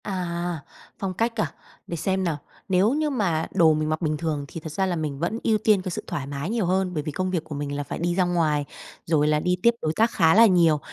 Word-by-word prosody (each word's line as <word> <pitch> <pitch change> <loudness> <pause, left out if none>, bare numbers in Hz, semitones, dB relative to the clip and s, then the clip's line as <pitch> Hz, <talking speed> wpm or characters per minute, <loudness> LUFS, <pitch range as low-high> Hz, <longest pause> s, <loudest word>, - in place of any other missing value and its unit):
À, 175 -3 -3 0.4
phong 195 -2 -2
cách 230 +5 -1
à? - - -2 0.4
Để 170 - -4
xem 190 +4 0
nào. 165 -4 -1 0.3
Nếu 190 +6 +3
như 305 +1 0
mà 185 - 0
đồ 160 -2 +5
mình 155 0 -1
mặc 155 +2 -1
bình 155 -2 0
thường 150 -2 -2
thì 165 - -7
thật 160 0 -8
ra 190 +5 0
là 185 -2 -1
mình 150 -4 -3
vẫn 195 +8 -1
ưu 220 -1 +3
tiên 210 -2 +3
cái 185 - -4
sự - - -4
thoải 135 -2 -4
mái 140 +4 -4
nhiều 225 -3 0
hơn, 185 0 0
bởi 150 -3 -2
vì 155 - -4
công 185 +4 -2
việc 170 -4 -1
của 160 -2 -7
mình 145 0 -3
là 145 - -2
phải 140 - -6
đi 175 +1 0
ra 185 - +3
ngoài, 160 -5 +1 0.4
rồi 155 -2 +2
là 150 0 +3
đi 180 +3 +1
tiếp 235 - +7
đối 155 - 0
tác 225 +1 +3
khá 165 -9 +4
là 230 +2 +8
nhiều. 170 -6 +4
170 Hz, 270 wpm, -24 LUFS, 155-190 Hz, 0.4 s, là